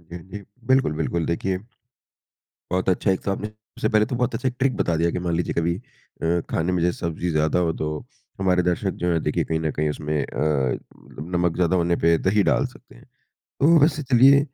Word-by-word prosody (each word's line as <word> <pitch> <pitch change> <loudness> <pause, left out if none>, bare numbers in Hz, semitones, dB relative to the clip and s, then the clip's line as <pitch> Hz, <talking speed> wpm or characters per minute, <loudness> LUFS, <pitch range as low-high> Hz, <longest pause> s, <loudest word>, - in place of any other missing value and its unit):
बिल्कुल, 100 - -2
बिल्कुल 80 +1 -1
देखिए 90 +2 -1 1.1
बहुत 95 +1 -1
अच्छा 95 +2 +2
एक 95 - +1
तो - - -2
आपने 105 +2 -4
सबसे 110 0 -5
पहले 110 -1 +3
तो 125 - -3
बहुत 125 -1 0
अच्छा 130 +3 0
एक 125 - -6
ट्रिक 135 -1 +1
बता 85 - +1
दिया 85 +1 +2
कि - - -3
मान 85 -1 -1
लीजिए 85 - -1
कभी 85 0 +1 0.5
अ, 85 +1 +2
खाने 85 +3 0
में 90 -2 0
जैसे 90 0 0
सब्जी 85 +1 -2
ज़्यादा 80 +1 +1
हो 80 - +1
तो 75 - -1 0.5
हमारे 90 -2 +3
दर्शक 90 +3 0
जो 90 0 +2
है 85 - +2
देखिए - - 0
कहीं 80 - -1
न 80 -1 -1
कहीं 75 0 0
उसमें 75 0 -2
अ, 70 -4 0 0.6
नमक 85 -1 +1
ज़्यादा 90 0 +2
होने 85 0 +2
पे 85 0 +5
दही 100 +4 +2
डाल - - +2
सकते - - -16
हैं। - - -17 0.6
तो 165 +4 +6
वैसे 150 +1 +3
चलिए 135 +1 +6
90 Hz, 205 wpm, -23 LUFS, 85-105 Hz, 1.1 s, तो